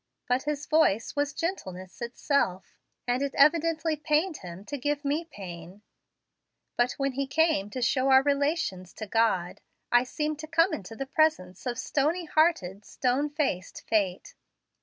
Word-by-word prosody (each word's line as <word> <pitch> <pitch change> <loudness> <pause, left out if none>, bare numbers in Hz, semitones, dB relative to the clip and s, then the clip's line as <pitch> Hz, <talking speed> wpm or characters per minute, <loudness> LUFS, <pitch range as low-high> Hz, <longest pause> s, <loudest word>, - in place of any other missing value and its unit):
But 250 +1 +2
his 295 -1 -2
voice 300 -9 +2
was 290 0 0
gentleness 185 - -5
itself, 235 -5 -1 0.3
and 245 +2 +1
it 280 -1 -2
evidently 320 +1 +3
pained 305 +3 0
him 180 +2 -10
to 290 - -5
give 290 +2 -1
me 300 +4 0
pain; 185 - -10 0.9
but 245 +1 +2
when 275 0 -1
he 275 +1 -2
came 310 -8 +2
to 250 +3 -4
show 260 +2 +2
our 265 0 +7
relations 285 - 0
to 215 - -6
God, 210 -5 +1 0.3
I 240 0 +5
seemed 300 +3 -3
to 310 - -7
come 330 +2 +3
into 225 -4 -6
the 270 - -4
presence 270 - 0
of 240 -1 -2
stony 310 +8 0
hearted, 305 - +1
stony 260 +6 0
faced 280 - -2
fate. 195 -4 0
275 Hz, 155 wpm, -28 LUFS, 210-305 Hz, 0.9 s, our